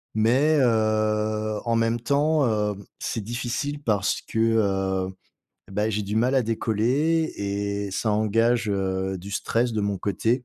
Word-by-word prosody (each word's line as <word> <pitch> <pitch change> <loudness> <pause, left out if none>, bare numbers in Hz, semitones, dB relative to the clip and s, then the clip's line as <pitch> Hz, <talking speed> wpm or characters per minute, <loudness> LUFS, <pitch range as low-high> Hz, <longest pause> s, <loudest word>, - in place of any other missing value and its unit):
mais, 130 +8 +3
heu, 110 -2 +1
en 115 -1 0
même 115 0 +1
temps, 145 +4 +2
heu, 105 -3 0 0.3
c'est 115 - -2
difficile 125 +6 -3
parce 105 -6 0
que, 110 - -4
heu, 95 -4 +1 0.6
bah, 105 +2 0
j'ai 105 0 -1
du 100 +1 -4
mal 125 +4 +2
à 130 - +4
décoller 125 +9 +1
et 100 0 -2
ça 110 +3 -1
engage, 115 +2 +2
heu, 95 -1 -1
du 95 +3 -9
stress 115 +4 0
de 110 - -1
mon 100 -1 -1
côté. 115 +7 0
110 Hz, 150 wpm, -25 LUFS, 100-120 Hz, 0.6 s, à